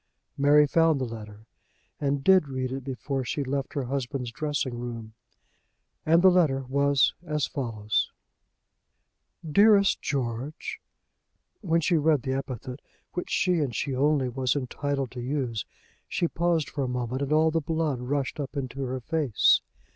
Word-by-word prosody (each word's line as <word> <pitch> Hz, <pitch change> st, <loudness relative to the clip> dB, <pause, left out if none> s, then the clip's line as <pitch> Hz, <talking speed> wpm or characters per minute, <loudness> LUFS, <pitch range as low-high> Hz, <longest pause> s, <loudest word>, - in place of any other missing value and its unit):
Mary 145 Hz, +1 st, +5 dB
found 160 Hz, 0 st, +3 dB
the 130 Hz, -, -1 dB
letter 110 Hz, -2 st, -9 dB, 0.5 s
and 140 Hz, -1 st, -1 dB
did 190 Hz, -3 st, +5 dB
read 130 Hz, -1 st, -3 dB
it 135 Hz, 0 st, -4 dB
before 135 Hz, +1 st, -3 dB
she 140 Hz, +4 st, -2 dB
left 135 Hz, +1 st, -3 dB
her 140 Hz, -, 0 dB
husband's 130 Hz, -1 st, -3 dB
dressing 140 Hz, -3 st, -2 dB
room, 115 Hz, -2 st, -6 dB, 0.9 s
and 165 Hz, +2 st, +5 dB
the 190 Hz, -, +8 dB
letter 150 Hz, -7 st, +2 dB
was 140 Hz, 0 st, +3 dB
as 150 Hz, -4 st, -1 dB
follows: 110 Hz, -6 st, -1 dB, 1.4 s
"Dearest 200 Hz, +4 st, +5 dB
George; 140 Hz, -, -3 dB, 0.4 s
" -, -, -50 dB
When 165 Hz, -4 st, +1 dB
she 170 Hz, +1 st, +2 dB
read 150 Hz, -3 st, +2 dB
the 130 Hz, -, -1 dB
epithet, 130 Hz, -1 st, -5 dB, 0.3 s
which 180 Hz, -, -4 dB
she 180 Hz, -2 st, +2 dB
and 135 Hz, -7 st, -1 dB
she 135 Hz, +3 st, -2 dB
only 140 Hz, 0 st, +2 dB
was 130 Hz, +1 st, 0 dB
entitled 140 Hz, -1 st, -2 dB
to 125 Hz, -, -6 dB
use, 125 Hz, -5 st, -2 dB, 0.4 s
she 170 Hz, -, 0 dB
paused 170 Hz, -2 st, 0 dB
for 140 Hz, -, -3 dB
a -, -, -1 dB
moment 125 Hz, +1 st, -3 dB
and 140 Hz, +1 st, -2 dB
all 155 Hz, +1 st, +4 dB
the 165 Hz, 0 st, 0 dB
blood 155 Hz, -3 st, -1 dB
rushed 135 Hz, +3 st, -2 dB
up 145 Hz, +1 st, -5 dB
into 135 Hz, 0 st, -4 dB
her 130 Hz, -1 st, -3 dB
face. 145 Hz, -6 st, +3 dB
140 Hz, 155 wpm, -27 LUFS, 125-155 Hz, 1.4 s, the